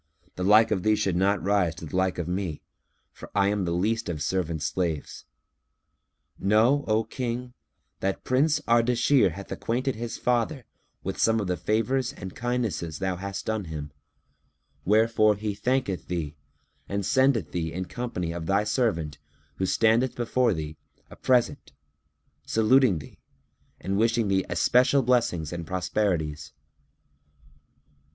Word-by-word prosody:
The 90 - -3
like 110 +3 +5
of 100 -4 +1
thee 110 +3 +3
should 100 -4 0
not 95 -1 +1
rise 95 -4 +1
to 85 - -8
the 80 - -7
like 95 0 +1
of 85 -2 -3
me, 90 -4 -3 0.5
for - - -12
I 100 -1 +3
am 100 -2 0
the 85 - -1
least 110 +6 0
of 80 -3 -3
servants' 85 -4 -1
slaves. 85 -5 -3 1.1
Know, 115 +8 +3
O 110 +1 +2
King, 125 +2 -4 0.5
that 95 0 -2
Prince 145 +4 +2
Ardashir 120 - +3
hath 100 +3 -9
acquainted 130 +3 -1
his 115 0 -5
father 125 +2 0 0.4
with - - -4
some 115 0 +3
of 105 - -2
the 90 -1 -1
favours 115 - 0
and 95 -8 -8
kindnesses 115 -10 -2
thou 95 0 -1
hast 100 +2 -5
done 110 -3 -2
him, 75 -2 -6 0.9
wherefore 110 +1 +4
he 105 +1 -3
thanketh 125 -3 -1
thee 80 -4 -3 0.5
and 100 -1 -2
sendeth 130 - +2
thee 80 -2 -2
in 90 +2 -4
company 90 -7 -4
of 85 -1 -5
thy 100 +3 +2
servant 105 - -1 0.4
who 95 - 0
standeth 115 +5 +2
before 120 0 +1
thee, 80 -4 -4 0.3
a - - -10
present, 125 -2 +1 0.7
saluting 115 -2 +3
thee 70 -3 -11 0.6
and 95 +1 -2
wishing 115 -1 +2
thee 95 -1 +1
especial 130 +2 +3
blessings 115 -11 +1
and 85 -1 -5
prosperities." 90 -5 -1
100 Hz, 145 wpm, -26 LUFS, 90-120 Hz, 1.1 s, like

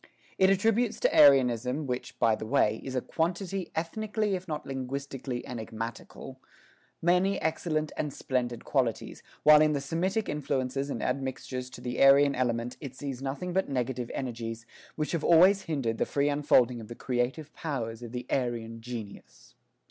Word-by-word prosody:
It 190 0 +6
attributes 225 +4 +2
to - - +2
Aryanism, 130 0 +5
which 125 -1 -4
by 115 - +3
the 110 0 -4
way, 110 -4 +2
is 130 -1 -5
a 130 - +1
quantity 180 +4 -2
ethnically 210 +5 -1
if 185 0 -4
not 150 -2 -4
linguistically 135 -1 -5
enigmatical, 115 +3 -7 0.6
many 180 +3 +3
excellent 155 -1 -1
and 150 -2 -2
splendid 120 -3 -2
qualities, 125 -5 -1 0.2
while 150 0 +8
in 155 0 +4
the 145 - 0
Semitic 180 +9 -1
influences 135 -2 -2
and - - -3
admixtures 130 -1 -3
to 125 - -11
the 125 0 -3
Aryan 140 +1 +7
element 120 -1 -1
it 135 -4 -7
sees 135 -2 -5
nothing 145 +7 -4
but 190 +1 0
negative 125 -2 -2
energies, 115 -3 -5 0.3
which 155 -1 -2
have 165 -3 -1
always 185 +4 +6
hindered 125 -8 -1
the - - +1
free 140 0 +1
unfolding 130 -5 +3
of 110 - -10
the 120 - -8
creative 130 +6 -2
powers 120 -7 -4
of 120 -2 -8
the 125 0 -5
Aryan 115 -3 -2
genius. 115 -4 -9
135 Hz, 160 wpm, -29 LUFS, 125-160 Hz, 0.6 s, while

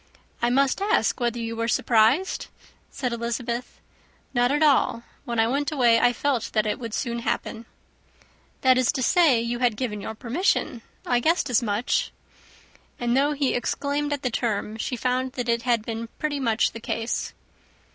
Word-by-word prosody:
"I 240 - +2
must 275 +7 +2
ask 415 -6 +1
whether 240 -1 0
you 230 -1 -4
were 230 0 -2
surprised?" 235 +11 +2 0.4
said 250 -3 -3
Elizabeth. 235 +1 -4 0.5
"Not 245 0 +2
at 295 +2 +2
all. 270 -5 +3 0.2
When 235 -1 -2
I 225 - +5
went 280 +5 -1
away, 240 -6 +4
I 245 - +4
felt 245 -3 -1
that 215 -1 +2
it 210 -1 -1
would 230 -3 -5
soon 235 -2 -2
happen." 230 0 -3 0.9
"That 255 -1 +5
is 255 - +3
to 260 - -2
say, 305 -5 +4
you 235 +1 -2
had 245 -4 +1
given 215 -5 -3
your 220 - -6
permission. 245 - -1 0.2
I 245 -1 +2
guessed 315 0 +1
as 240 - +3
much." 215 +2 0 0.9
And 240 0 0
though 285 +3 +3
he 280 -2 0
exclaimed 285 +4 -1
at 290 -2 -2
the 250 - 0
term, 220 -2 -2
she 250 - -3
found 255 +1 -1
that 245 -3 -4
it 235 0 +1
had 235 -3 0
been 230 0 -4
pretty 300 -2 -2
much 230 -4 +1
the 230 - -8
case. 225 +1 -3
240 Hz, 175 wpm, -25 LUFS, 230-270 Hz, 0.9 s, I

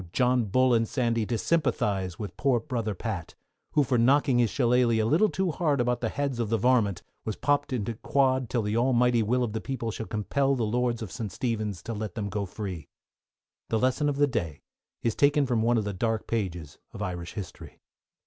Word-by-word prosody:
John 125 -1 +2
Bull 130 +5 +3
and 115 -1 +2
Sandy, 115 -4 0
to 120 - -1
sympathise 100 - 0
with 100 -5 -6
poor 130 -3 +2
Brother 115 -5 -3
Pat, 95 -5 -5 0.4
who 150 - +4
for 125 -2 +1
knocking 135 +1 +4
his 120 -2 +3
shillaleigh 120 -2 +2
a 110 - +2
little 165 - +3
too 190 -2 -1
hard 150 -4 0
about 125 0 0
the 115 - 0
heads 140 -2 -2
of 115 -3 -1
the 115 - +2
varmint, 110 -5 +2 0.2
was 110 - -3
popped 145 +1 0
into 115 -2 -2
quod 130 +1 +1
till 120 -3 0
the 105 +1 -1
Almighty 125 -1 +3
will 125 +4 +1
of 110 -3 -2
the 110 - -3
people 120 -4 -3
shall 110 0 -6
compel 135 +6 0
the 120 -3 0
Lords 120 +1 0
of 100 - -7
St. 105 +3 -5
Stephen's 105 -4 -3
to 115 - -4
let 105 -3 -5
them 105 -2 -3
go 100 0 -3
free. 90 -7 -6 0.8
_The 110 - +1
Lesson 130 +4 +2
for 140 - -5
the 145 - +5
Day 95 - -3 0.4
is 115 - +1
taken 145 +2 +3
from 120 -4 +1
one 120 +1 +3
of 110 - +1
the 100 0 -3
dark 110 +3 -1
pages 90 -9 -3
of 100 - -5
Irish 90 -3 -5
History. 95 -4 -8
115 Hz, 210 wpm, -27 LUFS, 105-130 Hz, 0.8 s, the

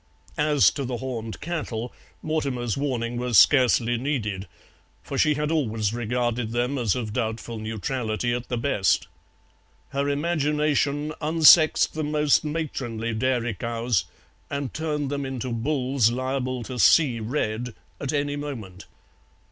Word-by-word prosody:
As 150 -1 +4
to 140 - -4
the 125 -1 -3
horned 115 -4 -5
cattle, 135 -8 -4 0.3
Mortimer's 135 -7 -1
warning 120 -4 -2
was 120 -2 +1
scarcely 120 -3 +5
needed, 105 -8 -2 0.6
for - - -6
she 150 -1 +3
had 150 +1 -1
always 110 -9 0
regarded 120 -1 -1
them 125 +3 0
as 115 -5 +1
of 115 -4 -4
doubtful 115 0 -3
neutrality 110 +1 -2
at 120 0 -4
the 125 - -1
best: 115 -6 +1 0.8
her 140 +1 -1
imagination 150 -1 0
unsexed 155 0 +6
the 155 - -3
most 150 -1 +2
matronly 130 -8 -3
dairy 120 0 0
cows 115 +1 -1 0.4
and 140 -2 -3
turned 150 -3 -2
them 140 -1 -2
into 130 -2 -4
bulls 130 0 +1
liable 130 0 -2
to 125 +2 -6
"see 130 -6 +5
red" 115 0 -2 0.2
at 140 - -2
any 145 -1 -1
moment. 115 -11 -7
125 Hz, 130 wpm, -25 LUFS, 115-145 Hz, 0.8 s, unsexed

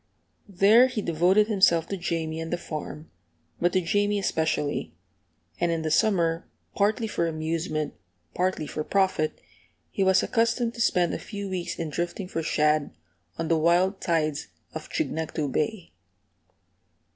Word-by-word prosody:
There 205 +6 +6
he 255 -4 -4
devoted 180 +6 +3
himself 190 -6 +3
to 200 - -2
Jamie 165 -3 -3
and 165 - -5
the 175 - 0
farm, 155 -1 -7 0.5
but 175 +1 +2
to 185 - +3
Jamie 205 +4 +1
especially; 155 - -1 0.6
and 170 - +1
in 165 -1 -1
the 155 - -1
summer, 170 -3 +2 0.2
partly 210 +3 +1
for 170 -6 -1
amusement, 155 -1 -2 0.4
partly 185 -4 -1
for 155 - -4
profit, 190 -4 0 0.5
he 195 - 0
was 190 0 +4
accustomed 230 0 +1
to 235 - -5
spend 180 -5 +2
a - - -3
few 200 -2 -6
weeks 180 -2 -3
in 165 -2 -4
drifting 175 +4 -3
for 165 - -3
shad 150 -1 +1 0.5
on 165 - -2
the 165 -1 +2
wild 180 +4 +2
tides 155 -3 0 0.3
of - - -7
Chignecto 160 -2 -2
Bay. 180 +3 -2
170 Hz, 145 wpm, -26 LUFS, 160-195 Hz, 0.6 s, There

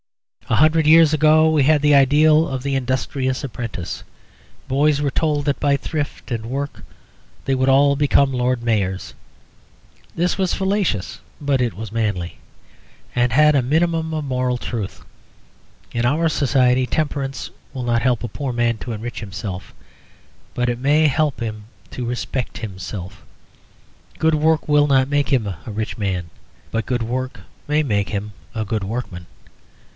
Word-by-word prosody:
A - - +3
hundred 155 +1 +4
years 160 0 +6
ago 155 +1 +5
we 155 -3 +3
had 150 +1 +4
the 150 0 +4
ideal 150 +3 +5
of 130 -2 -4
the 140 0 -1
Industrious 130 0 -1
Apprentice; 115 -9 -5 0.6
boys 145 +2 +2
were 145 -1 0
told 150 0 0
that 145 -2 0
by 140 -1 +3
thrift 150 +1 -4
and 115 -1 -3
work 140 +3 -4 0.6
they 135 - +1
would 130 +1 +2
all 140 +1 +5
become 140 -1 +3
Lord 125 -1 0
Mayors. 100 -5 -1 1.0
This 175 +1 0
was 190 -2 0
fallacious, 190 - -1 0.2
but 140 -3 +1
it 120 -3 0
was 110 0 -7
manly, 105 -6 -2 0.8
and 120 0 +2
had 150 +4 +5
a 135 - +4
minimum 160 +4 0
of 155 -2 -2
moral 125 -2 0
truth. 115 -5 -5 0.9
In 120 - -1
our 150 +7 +2
society, 130 -4 +2
temperance 140 -1 -2 0.2
will 130 - -5
not 120 -1 +1
help 125 -2 +1
a - - -2
poor 140 +1 -4
man 120 -1 +1
to 120 - -6
enrich 115 +2 -5
himself, 100 -2 -6 0.8
but 125 0 0
it 120 0 -1
may 150 +4 +4
help 150 -1 0
him 110 -3 -5 0.3
to 125 - -4
respect 125 +1 -3
himself. 95 -2 -7 1.0
Good 160 0 +3
work 155 +1 +2
will 150 -1 +4
not 135 -2 +3
make 145 0 0
him 125 -6 +1
a 90 -4 -5
rich 110 +1 -4
man, 95 -5 -2 0.4
but 115 0 -2
good 125 -2 0
work 130 +3 -4 0.3
may 150 +1 +2
make 105 -7 0
him 105 0 -4 0.2
a 110 -1 -2
good 105 0 -2
workman. 95 -5 -5
130 Hz, 160 wpm, -21 LUFS, 115-150 Hz, 1.0 s, years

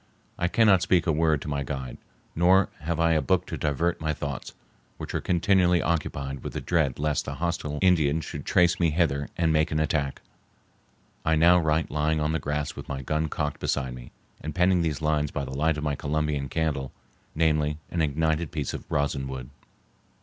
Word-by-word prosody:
I 90 - +2
cannot 100 -2 +4
speak 90 -2 +2
a 85 - +2
word 80 -1 +2
to - - -8
my 70 -1 -1
guide, 65 -2 -5 0.4
nor 90 +3 +4
have 80 +1 -3
I 85 0 +3
a 80 -1 +3
book 70 - +1
to - - -5
divert 80 +4 -1
my 80 -1 -1
thoughts, 70 -3 -5 0.4
which - - -7
are - - -1
continually 90 0 +3
occupied 70 -5 -2
with - - -5
the - - -3
dread 75 -7 0
lest 75 -1 0
the - - -4
hostile 80 -3 -2
Indians 80 -4 +3
should - - -6
trace 90 0 +3
me 85 -2 +3
hither 75 -3 0
and 80 -2 +2
make 75 0 +2
an 75 - 0
attack. 75 -3 -1 1.0
I 80 - +2
now 85 +3 +6
write 80 0 0
lying 75 +1 +1
on 75 0 0
the 80 - 0
grass 75 0 -3
with - - -9
my 65 -1 -4
gun 75 +3 -1
cocked 75 -1 -3
beside 65 -2 -1
me, - - -10 0.3
and 75 0 -6
penning 90 0 +3
these 80 -2 -2
lines 75 -1 +1
by 70 -1 -3
the 65 - -7
light 80 +2 +1
of 75 - -4
my 75 -1 0
Columbian 75 -1 -1
candle, 70 -4 -1 0.4
namely, 75 -1 +1
an 85 - 0
ignited 80 +1 0
piece 75 -4 -3
of - - -8
rosin 70 -2 -1
wood. 65 -2 -7
75 Hz, 200 wpm, -26 LUFS, 70-85 Hz, 1.0 s, now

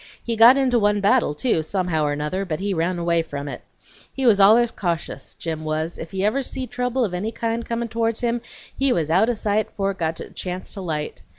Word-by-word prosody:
He 230 - -1
got 235 +4 +8
into 255 -3 +3
one 205 -1 +2
battle, 205 - +2
too, 195 - +1
somehow 165 -2 -1
or 145 0 0
nother, 150 +7 -2
but 160 -5 -3
he 200 +1 -1
run 175 +1 0
away 170 -1 +1
from 145 -3 -6
it. 140 - -6 0.5
He 270 - -3
was 215 -4 +5
allers 225 +4 +6
cautious, 170 -7 -4
Jim 160 -1 -4
was; 155 +2 -3
if 165 - -6
he 190 +2 -1
ever 220 +7 +1
see 260 0 -4
trouble 250 0 -1
of 190 - -5
any 200 +5 -2
kind 230 0 -2
comin' 235 0 -3
towards 225 0 -1
him, 240 -1 0 0.3
he 270 -1 +1
was 160 -7 0
out 195 +7 +4
o' - - +2
sight 215 -1 0
fore 195 -1 -1
it 190 - -11
got 160 -1 -2
a - - -8
chance 180 0 -5
to 200 - -5
light. 155 -4 -4
195 Hz, 230 wpm, -22 LUFS, 165-230 Hz, 0.5 s, got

